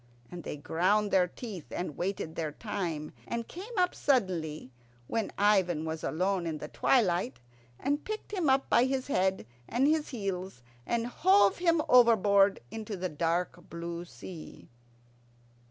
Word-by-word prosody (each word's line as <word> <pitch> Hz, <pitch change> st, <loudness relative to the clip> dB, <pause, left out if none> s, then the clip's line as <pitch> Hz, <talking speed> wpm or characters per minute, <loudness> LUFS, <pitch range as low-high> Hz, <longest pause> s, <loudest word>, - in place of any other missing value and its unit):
And 175 Hz, -2 st, -7 dB
they -, -, -5 dB
ground 185 Hz, +8 st, +1 dB
their 180 Hz, -2 st, +4 dB
teeth, 195 Hz, -, -8 dB
and 175 Hz, -5 st, -4 dB
waited 180 Hz, -3 st, -3 dB
their 160 Hz, -2 st, -3 dB
time, 165 Hz, -5 st, -4 dB
and 235 Hz, -1 st, -3 dB
came 410 Hz, +6 st, -8 dB
up 360 Hz, -1 st, +3 dB
suddenly, 170 Hz, -, 0 dB, 0.3 s
when 225 Hz, -, -2 dB
Ivan 190 Hz, -6 st, +3 dB
was 160 Hz, 0 st, -4 dB
alone 185 Hz, +1 st, 0 dB
in 160 Hz, -2 st, -2 dB
the 150 Hz, +1 st, -7 dB
twilight, 220 Hz, -3 st, +2 dB, 0.4 s
and 285 Hz, +2 st, -1 dB
picked 430 Hz, 0 st, -6 dB
him 355 Hz, -8 st, +1 dB
up 265 Hz, +1 st, +3 dB
by 240 Hz, -, +4 dB
his 265 Hz, 0 st, -1 dB
head 190 Hz, -, +1 dB, 0.2 s
and 250 Hz, +3 st, +2 dB
his 310 Hz, 0 st, +1 dB
heels, 190 Hz, -, -4 dB, 0.2 s
and 235 Hz, -1 st, 0 dB
hove 200 Hz, -, +4 dB
him 335 Hz, -3 st, +3 dB
overboard 205 Hz, -5 st, +5 dB
into 215 Hz, -2 st, -5 dB
the 185 Hz, 0 st, -2 dB
dark 170 Hz, +3 st, -2 dB
blue 170 Hz, +1 st, -5 dB
sea. 175 Hz, -1 st, -11 dB
195 Hz, 150 wpm, -30 LUFS, 170-240 Hz, 0.4 s, overboard